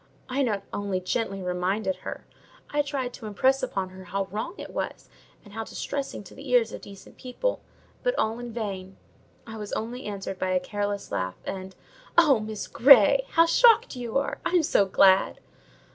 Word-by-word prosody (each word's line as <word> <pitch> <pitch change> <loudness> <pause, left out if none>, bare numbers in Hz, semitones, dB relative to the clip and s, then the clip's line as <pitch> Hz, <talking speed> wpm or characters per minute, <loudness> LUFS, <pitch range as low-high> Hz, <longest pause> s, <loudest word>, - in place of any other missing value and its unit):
I 265 +2 -1
not 210 -7 0
only 200 -2 -1
"gently 195 +1 -2
reminded" 185 +9 -1
her, - - -7 0.5
I 295 - +2
tried 275 -4 -3
to 220 - -8
impress 260 +6 +2
upon 190 -1 -2
her 185 0 -12
how 195 +2 -2
wrong 220 - -4
it - - -8
was, - - -4 0.4
and 205 - -14
how 225 +1 -3
distressing 270 0 -5
to 185 - -14
the 275 0 -10
ears 240 -3 +3
of - - -7
decent 195 -1 -13
people: - - -3 0.4
but - - 0
all 220 +2 0
in 240 -1 -6
vain: 195 -4 -5 0.5
I 225 -1 -8
was 210 -1 -7
only 245 +4 -4
answered 195 -2 -5
by 185 - -1
a 185 - +3
careless 205 +2 -3
laugh, 95 0 -2
and, 190 -1 -6 0.4
"Oh, 300 -8 +6
Miss 215 -1 -5
Grey, 270 +1 +6
how 330 - +6
shocked 455 - +5
you 245 0 -2
are! 275 - -2
I'm 355 -2 +2
so 200 -8 +3
glad!" 190 0 +4
220 Hz, 180 wpm, -26 LUFS, 195-265 Hz, 0.5 s, Oh